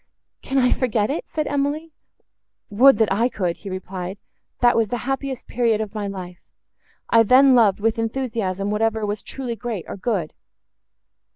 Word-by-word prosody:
"Can 275 - -3
I 250 -1 +4
forget 230 -2 +1
it?" 310 - -4
said 310 -1 -2
Emily.—"Would 285 -4 0
that 220 -3 +2
I 230 +5 +2
could!" 180 -7 -2
he 200 - -9
replied;—"that 185 +5 -3
was 225 -1 +2
the 245 - -2
happiest 270 -1 -3
period 230 -3 +1
of 215 -2 -4
my 210 -2 -3
life. 180 -3 -8 0.7
I 230 - +7
then 260 +4 +6
loved, 215 -6 +4
with 225 +2 0
enthusiasm, 225 -5 -2
whatever 220 0 0
was 205 +1 -3
truly 255 -3 -5
great, 220 -4 -5
or - - -6
good." 190 -6 -2
225 Hz, 155 wpm, -22 LUFS, 200-255 Hz, 0.7 s, I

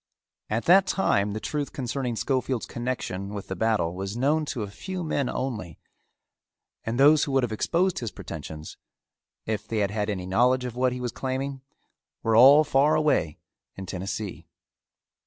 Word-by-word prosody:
At 110 +2 -1
that 190 +2 +6
time 100 - +1
the 110 - -3
truth 145 +4 -3
concerning 125 -2 -3
Schofield's 130 0 -1
connection 105 -5 -4
with 100 - -7
the 95 - -3
battle 110 -7 +1
was 95 +4 -5
known 150 +5 +2
to 125 -6 -3
a - - -4
few 185 - -6
men 145 -5 -1
only 110 - -4 1.1
and 115 +3 -3
those 150 +2 +6
who 140 - -4
would 135 -1 +3
have 120 - -1
exposed 175 - +1
his 115 - -3
pretensions, 80 -5 -8 0.7
if 110 -1 -3
they 115 - -2
had 100 -2 +1
had 105 0 -2
any 95 -3 -3
knowledge 125 +7 +2
of 120 -2 -5
what 130 0 +2
he 125 - -4
was 125 -1 -3
claiming, 135 +2 -3 0.6
were 115 -1 +2
all 140 +6 +8
far 150 +1 +3
away 150 - +1 0.4
in 95 - -7
Tennessee. 95 -1 -5
120 Hz, 170 wpm, -26 LUFS, 100-140 Hz, 1.1 s, all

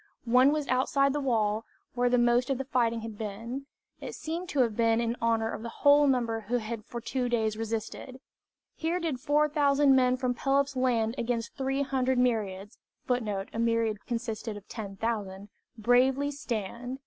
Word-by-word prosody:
One 250 +4 +5
was 300 -1 -1
outside 275 +2 +2
the 295 - -1
wall, 220 -5 0 0.3
where 245 0 +1
most 240 +1 +3
of 270 - +1
the 270 - -4
fighting 235 -4 +1
had 220 -2 -8
been. 230 +6 -5 0.3
It - - -7
seems 340 +3 -5
to 280 - +2
have 230 -4 +1
been 230 0 +3
in 235 0 0
honor 225 -1 +1
of - - -6
the 230 - -5
whole 285 +4 +4
number 235 -4 +1
who 245 +2 +1
had 225 -1 -5
for 235 - -6
two 250 +1 -2
days 220 -3 0
resisted 225 +3 -5 0.6
"Here 335 +2 -1
did 320 -7 -2
four 295 +3 +2
thousand 285 -2 +3
men 255 -1 +3
from 250 -1 0
Pelops' 275 +2 +1
land 235 -3 +1
Against 235 -1 -2
three 270 +1 -1
hundred 260 -1 0
myriads 210 -5 -1 0.3
[Footnote: 210 -6 -1
A 225 - -4
myriad 230 -2 0
consisted 230 -3 -4
of 205 - -13
ten 205 -4 -7
thousand.] 205 -2 -3 0.3
bravely 255 +5 +3
stand." 245 -2 -4
245 Hz, 175 wpm, -29 LUFS, 225-270 Hz, 0.6 s, One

